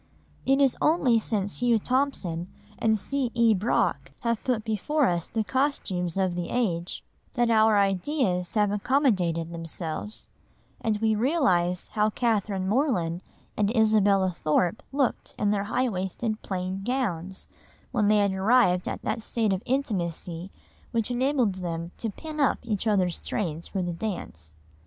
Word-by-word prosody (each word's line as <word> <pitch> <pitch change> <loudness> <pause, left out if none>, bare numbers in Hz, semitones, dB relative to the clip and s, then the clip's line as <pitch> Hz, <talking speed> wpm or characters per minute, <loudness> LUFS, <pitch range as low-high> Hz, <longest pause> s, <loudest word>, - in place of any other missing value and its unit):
It 270 +1 +4
is 275 -3 +4
only 275 -8 +4
since 205 -3 -1
Hugh 240 -2 +4
Thompson 205 -9 -1 0.3
and 220 -1 +3
C. 260 +5 -1
E. 230 -1 +5
Brock 140 - 0
have 235 -2 -1
put 235 -4 -1
before 260 +8 +1
us 175 -5 0
the 220 -1 -1
costumes 200 - -1
of 190 -2 +1
the 175 0 -3
age, 180 -8 -1 0.3
that 240 -2 +2
our 220 -1 +5
ideas 195 - 0
have 210 -2 +3
accommodated 195 - +1
themselves, 165 +4 -6 0.6
and 220 -2 +1
we 220 0 +2
realise 210 - +1
how 215 0 +1
Catherine 210 -4 0
Morland 190 - +1 0.3
and 205 -1 +1
Isabella 205 -4 +4
Thorpe 170 +3 0
looked 275 -2 -1
in 205 -1 +1
their 200 -1 0
high 255 +5 0
waisted 215 +2 -3
plain 185 0 -3
gowns, 195 -8 -2 0.4
when 215 -5 +2
they 210 0 +5
had 200 -2 +2
arrived 190 -2 +3
at - - -4
that 220 +1 -2
stage 220 -2 0
of 190 - -2
intimacy 180 - -2 0.4
which 230 +1 -1
enabled 250 -3 +1
them 170 -1 -4
to 225 - -2
pin 310 +8 -8
"up 280 - +3
each 220 -2 -2
other's 185 -5 +1
trains 170 -5 -3
for 190 -2 -2
the 175 -1 -2
dance." 80 - -6
210 Hz, 150 wpm, -26 LUFS, 180-240 Hz, 0.6 s, E